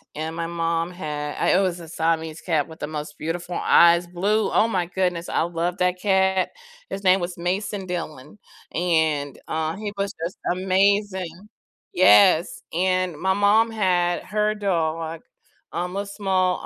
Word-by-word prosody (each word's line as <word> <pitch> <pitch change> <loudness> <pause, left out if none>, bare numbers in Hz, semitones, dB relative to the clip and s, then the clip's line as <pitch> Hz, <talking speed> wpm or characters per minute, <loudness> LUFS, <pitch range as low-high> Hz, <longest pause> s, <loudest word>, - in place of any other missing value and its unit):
and 160 +1 -4
my 165 0 -3
mom 165 0 -1
had 150 -4 -5
I - - +1
it - - +3
was 180 -2 -1
a 165 - -11
Siamese 160 -1 -1
cat 160 -4 -1
with 160 - -12
the 150 - -4
most 150 -1 -6
beautiful 175 +2 -4
eyes, 170 +1 +5
blue, 200 +5 0
oh 225 - +3
my 180 -4 0
goodness, 180 -1 -2
I - - 0
loved 170 +1 -2
that 180 0 +1
cat, 190 -1 +2 0.4
his 195 - -5
name 185 0 +5
was 175 0 -4
Mason 190 +3 -2
Dillon, 165 -1 -6 0.3
and, 160 -5 0
uh, 160 +1 -1
he 205 0 -5
was 200 0 -2
just 175 - -4 0.2
amazing 190 0 0 0.4
yes, 185 -2 +5
and 185 0 +1
my 190 +5 +1
mom 205 +3 +4
had 180 -5 +1
her 210 +1 0
dog, 165 -5 -2 0.5
um, 180 +2 -3
a 200 +1 -2
small, 190 -3 0
180 Hz, 160 wpm, -23 LUFS, 165-190 Hz, 0.5 s, eyes